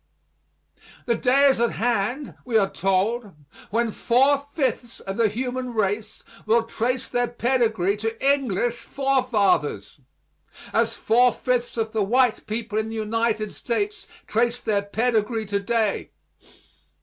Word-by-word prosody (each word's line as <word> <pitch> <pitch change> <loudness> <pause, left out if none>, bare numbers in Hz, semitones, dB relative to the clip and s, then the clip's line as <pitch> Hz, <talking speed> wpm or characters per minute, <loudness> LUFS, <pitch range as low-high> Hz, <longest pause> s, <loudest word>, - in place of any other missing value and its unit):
The 235 - +2
day 255 +4 +3
is 270 -4 +4
at 235 - +2
hand, 240 +5 -1
we 235 -3 +1
are 195 -2 +2
told, 195 +3 0 0.4
when 230 +2 0
four 270 +6 +3
fifths 280 -4 -3
of 195 - -6
the 230 0 +3
human 250 +2 -4
race 210 +1 -2 0.2
will 225 +1 +4
trace 235 +2 -2
their 245 0 0
pedigree 230 -5 +1
to 225 +6 +1
English 240 -3 -1
forefathers, 260 - 0 0.7
as - - +1
four 245 +2 +4
fifths 245 -1 -2
of 220 -1 -1
the 220 - 0
white 245 +3 +2
people 220 0 -2
in 220 0 -3
the 225 - -6
United 220 -1 -1
States 405 - -3 0.2
trace 235 +2 0
their 210 -4 0
pedigree 220 +1 0
to 200 0 -1
day. 215 0 -1
230 Hz, 135 wpm, -24 LUFS, 215-250 Hz, 0.7 s, is